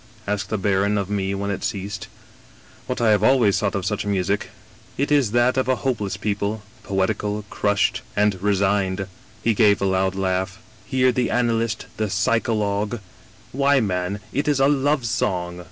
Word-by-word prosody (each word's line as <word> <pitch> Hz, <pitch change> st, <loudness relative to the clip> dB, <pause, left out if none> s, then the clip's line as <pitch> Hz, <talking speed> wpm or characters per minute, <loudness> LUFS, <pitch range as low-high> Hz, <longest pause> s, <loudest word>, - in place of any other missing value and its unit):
asked 105 Hz, 0 st, -2 dB
the 110 Hz, -, -1 dB
baron 100 Hz, +1 st, +1 dB
of 100 Hz, 0 st, -2 dB
mc 100 Hz, -1 st, -1 dB
when 100 Hz, +1 st, -2 dB
it 100 Hz, -, -4 dB
ceased. 100 Hz, +1 st, -4 dB, 0.2 s
" -, -, -26 dB
* -, -, -25 dB
What -, -, -2 dB
I 115 Hz, -2 st, +4 dB
have 105 Hz, -2 st, +3 dB
always 120 Hz, -5 st, +4 dB
thought 100 Hz, -2 st, -1 dB
of 95 Hz, -2 st, -2 dB
such 105 Hz, +1 st, -1 dB
music 100 Hz, 0 st, -1 dB, 0.3 s
— -, -, -26 dB
^it 140 Hz, +2 st, -1 dB
is 140 Hz, -6 st, +4 dB
that 120 Hz, +3 st, +2 dB
of 130 Hz, -, +1 dB
a 130 Hz, -, +3 dB
hopeless 105 Hz, -7 st, -1 dB
people; 105 Hz, 0 st, -2 dB, 0.2 s
poetical, 105 Hz, +2 st, -1 dB
crushed, 100 Hz, -1 st, +1 dB
and 105 Hz, -3 st, +1 dB
resigned.' 100 Hz, -1 st, +1 dB, 0.2 s
" 105 Hz, -, -27 dB
He 115 Hz, -, +3 dB
gave 105 Hz, -1 st, +4 dB
a -, -, 0 dB
loud 95 Hz, 0 st, +1 dB
laugh. 95 Hz, 0 st, -1 dB, 0.2 s
* 110 Hz, -1 st, -26 dB
Hear 130 Hz, -1 st, +3 dB
the 125 Hz, 0 st, 0 dB
analyst, 115 Hz, -2 st, 0 dB
the 110 Hz, -1 st, -1 dB
psycho 115 Hz, +3 st, +1 dB
logue 105 Hz, +2 st, -1 dB, 0.6 s
^why, 140 Hz, -3 st, +3 dB
man, 90 Hz, +1 st, -2 dB
it 140 Hz, +4 st, -1 dB
is 145 Hz, -2 st, +2 dB
a 135 Hz, -, +5 dB
love 145 Hz, -1 st, +1 dB
song 90 Hz, -5 st, -1 dB
105 Hz, 190 wpm, -22 LUFS, 95-115 Hz, 0.6 s, a